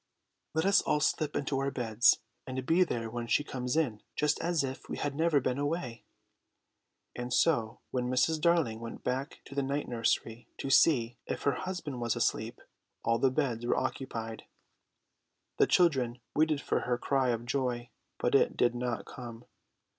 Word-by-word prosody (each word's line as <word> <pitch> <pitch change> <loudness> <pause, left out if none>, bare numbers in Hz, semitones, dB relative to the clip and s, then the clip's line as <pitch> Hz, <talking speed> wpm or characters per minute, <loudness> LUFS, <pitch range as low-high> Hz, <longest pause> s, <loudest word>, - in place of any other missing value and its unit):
"Let 160 - +2
us 200 +1 +5
all 150 - +1
slip 150 0 0
into 140 -1 -1
our 135 0 0
beds, 120 -3 +3 0.3
and 130 0 -4
be 170 +6 +4
there 115 -9 -3
when 120 +1 -5
she 145 - +2
comes 125 0 -3
in, 120 -10 0
just 150 0 +1
as 170 -3 +1
if 130 0 -6
we - - -3
had 145 -1 -2
never 160 0 +3
been 130 0 -1
away." 145 -6 -3 1.1
And 125 0 -5
so 120 -6 +2
when 125 -1 -1
Mrs. 155 +5 +2
Darling 165 -10 +2
went 115 0 -8
back 135 +4 -3
to - - -11
the 140 - 0
night 140 +2 -2
nursery 115 0 -1
to 135 - -3
see 120 -6 +4
if - - -3
her 140 - +3
husband 155 -4 -4
was 115 -1 0
asleep, - - -1 0.4
all 115 0 +2
the 135 - +4
beds 125 -4 -1
were 120 - +1
occupied. 115 -4 -4 1.1
The - - +5
children 130 -9 +3
waited 155 -1 +2
for - - 0
her 125 -1 -1
cry 135 0 +1
of 120 0 -1
joy, 125 -2 -2 0.3
but - - 0
it - - +3
did 120 -1 +3
not 120 -1 -3
come. 120 -2 -9
130 Hz, 175 wpm, -31 LUFS, 120-150 Hz, 1.1 s, us